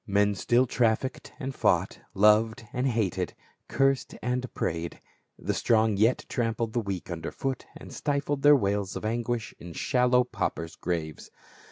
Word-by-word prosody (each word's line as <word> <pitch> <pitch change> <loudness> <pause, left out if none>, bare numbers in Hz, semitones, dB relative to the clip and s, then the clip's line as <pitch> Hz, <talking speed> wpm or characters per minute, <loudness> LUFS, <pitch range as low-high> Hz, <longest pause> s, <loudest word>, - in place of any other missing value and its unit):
Men 100 0 +3
still 120 +6 +2
trafficked 120 +2 0
and 135 -2 -4
fought, - - +1 0.2
loved 110 +4 +4
and 125 +2 0
hated, 95 -7 -1 0.3
cursed 135 -1 +1
and 125 0 -1
prayed. 85 +1 -3 0.4
The - - -2
strong 110 -2 +2
yet 110 +5 +2
trampled 115 -1 -1
the 120 - +1
weak 95 -5 -4
under 80 -1 -4
foot 135 -2 -4
and - - -11
stifled 140 -1 -1
their 145 +1 +8
wails 100 -5 0
of - - -5
anguish 120 0 -2
in 85 0 -9
shallow 125 +5 +3
paupers' 85 -8 -3
graves. 80 -3 -4
115 Hz, 150 wpm, -28 LUFS, 100-125 Hz, 0.4 s, their